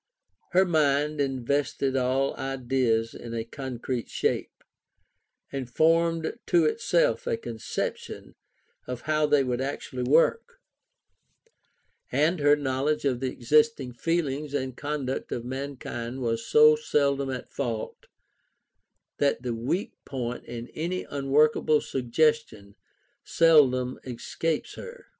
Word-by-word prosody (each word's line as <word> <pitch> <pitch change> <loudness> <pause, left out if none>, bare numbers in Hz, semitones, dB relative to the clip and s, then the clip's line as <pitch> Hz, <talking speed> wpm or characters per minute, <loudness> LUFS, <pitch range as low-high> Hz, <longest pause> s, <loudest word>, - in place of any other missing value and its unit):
Her 185 +2 +5
mind 150 -3 +2
invested 135 0 -1
all 130 +1 +1
ideas 125 -4 0
in 115 -1 -7
a 115 - -2
concrete 125 0 -5
shape, - - -2 0.9
and 135 -3 -4
formed 165 - +2
to 345 -2 +4
itself 485 +2 +1
a 470 -2 0
conception 470 +1 -5 0.5
of 125 -1 -5
how 155 +1 +1
they 145 -2 +4
would 125 -1 -1
actually 135 -1 -4
work: 165 - +2 1.5
and 155 +6 +2
her 145 0 +5
knowledge 145 +1 -1
of 130 -3 +1
the 130 0 -1
existing 150 0 +2
feelings 150 0 -1
and 130 -3 -2
conduct 145 -2 -3
of 120 - -3
mankind 130 -2 -5
was 115 -2 -2
so 455 0 +7
seldom 140 - 0
at 130 -1 -5
fault, 115 -5 -4 1.1
that 140 -3 +1
the 125 -2 -2
weak 125 - -2
point 125 -3 -5
in 120 0 -7
any 175 +4 -3
unworkable 150 +2 +3
suggestion 130 -5 0 0.5
seldom 130 -6 +4
escapes 150 +5 -3
her. 475 0 -10
140 Hz, 115 wpm, -27 LUFS, 125-155 Hz, 1.5 s, so